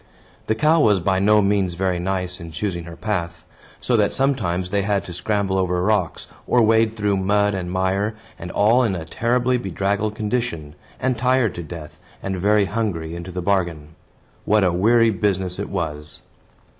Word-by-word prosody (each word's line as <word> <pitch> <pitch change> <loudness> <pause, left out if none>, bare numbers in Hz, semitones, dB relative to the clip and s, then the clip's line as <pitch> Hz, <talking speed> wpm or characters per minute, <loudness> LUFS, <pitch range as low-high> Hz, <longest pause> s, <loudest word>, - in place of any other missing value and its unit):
The 110 - +1
cow 155 +7 +3
was 105 -6 +4
by 95 +2 +1
no 105 +1 +4
means 100 -3 +1
very 90 -1 0
nice 90 0 -2
in 85 - -8
choosing 85 -1 -3
her 85 -1 -9
path; 90 -6 -3 0.3
so - - 0
that - - +2
sometimes 100 -10 0
they 100 - +1
had 100 0 0
to 90 - -7
scramble 95 +1 -1
over 90 -1 0
rocks, 95 -5 0 0.2
or 125 - +3
wade 110 0 +3
through 105 -2 +1
mud 100 +2 +2
and 90 -2 -3
mire, 95 +4 0 0.2
and 85 - -7
all 110 +7 +3
in 110 -6 +1
a 80 -3 -5
terribly 120 +7 +1
bedraggled 100 +1 -1
condition, 105 -9 -3 0.3
and 130 -2 -1
tired 125 -3 +2
to 85 - -6
death, 80 -1 -9 0.2
and 95 -1 -2
very 105 +2 +3
hungry, 95 -7 -3
into 85 +2 -7
the 90 0 -4
bargain. 85 -6 -1 0.5
What 105 -1 +3
a 90 -2 +2
weary 115 +5 +4
business 95 -2 -1
it 100 - -4
was! 75 -5 -5
95 Hz, 180 wpm, -21 LUFS, 90-110 Hz, 0.5 s, was